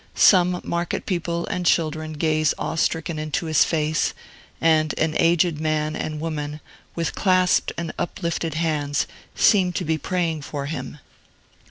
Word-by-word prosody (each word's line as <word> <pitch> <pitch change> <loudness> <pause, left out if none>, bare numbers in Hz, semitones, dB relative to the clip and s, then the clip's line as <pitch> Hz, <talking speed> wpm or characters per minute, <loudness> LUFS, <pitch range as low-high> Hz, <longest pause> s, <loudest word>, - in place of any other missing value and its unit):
Some 180 -2 +5
market 170 0 -2
people 170 -2 -2
and 180 -4 -3
children 155 -2 +1
gaze 155 -1 +1
awe - - -3
stricken 160 0 -1
into 155 +4 -2
his 155 -2 +4
face, 155 -1 0 0.4
and 155 -2 +2
an 160 -1 +1
aged 165 -1 +3
man 155 0 0
and 155 -1 -4
woman, 150 -2 -4 0.4
with 165 -2 -2
clasped 185 -2 +2
and 170 -1 -3
uplifted 170 -2 -2
hands, 150 -3 0 0.3
seem 190 -4 +4
to 180 - -2
be 160 0 0
praying 170 -4 -1
for 140 0 -5
him. 150 0 -5
160 Hz, 145 wpm, -23 LUFS, 155-170 Hz, 0.4 s, Some